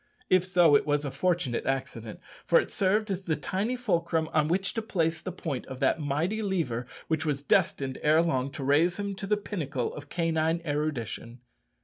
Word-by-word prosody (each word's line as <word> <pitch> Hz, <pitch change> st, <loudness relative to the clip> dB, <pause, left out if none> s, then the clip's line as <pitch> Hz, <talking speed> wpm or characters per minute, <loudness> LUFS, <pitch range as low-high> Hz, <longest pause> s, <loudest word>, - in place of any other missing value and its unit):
If 185 Hz, 0 st, +4 dB
so, 175 Hz, -5 st, +5 dB
it -, -, +3 dB
was 145 Hz, 0 st, +1 dB
a 140 Hz, -, -3 dB
fortunate 170 Hz, -11 st, 0 dB
accident, 125 Hz, -5 st, -3 dB, 0.2 s
for -, -, +5 dB
it -, -, -3 dB
served 205 Hz, +2 st, +1 dB
as 190 Hz, 0 st, -3 dB
the 160 Hz, -, +1 dB
tiny 195 Hz, -, -2 dB
fulcrum 170 Hz, -9 st, 0 dB
on 155 Hz, -1 st, +3 dB
which 190 Hz, +4 st, 0 dB
to 225 Hz, -, -1 dB
place 165 Hz, -6 st, -1 dB
the 185 Hz, -, -4 dB
point 155 Hz, -7 st, -4 dB
of 130 Hz, -1 st, -7 dB
that 135 Hz, +3 st, +2 dB
mighty 155 Hz, +9 st, -1 dB
lever 160 Hz, -, -1 dB, 0.2 s
which 160 Hz, -1 st, 0 dB
was 145 Hz, -3 st, -1 dB
destined 135 Hz, -1 st, +1 dB
ere 155 Hz, +2 st, +4 dB
long 135 Hz, -5 st, 0 dB
to 140 Hz, -, -5 dB
raise 155 Hz, +6 st, +3 dB
him 200 Hz, -1 st, -3 dB
to 195 Hz, +1 st, -6 dB
the 210 Hz, +1 st, +2 dB
pinnacle 150 Hz, -, -3 dB
of 145 Hz, -1 st, -9 dB
canine 165 Hz, 0 st, +1 dB
erudition. 135 Hz, -6 st, -3 dB
160 Hz, 195 wpm, -28 LUFS, 140-185 Hz, 0.2 s, so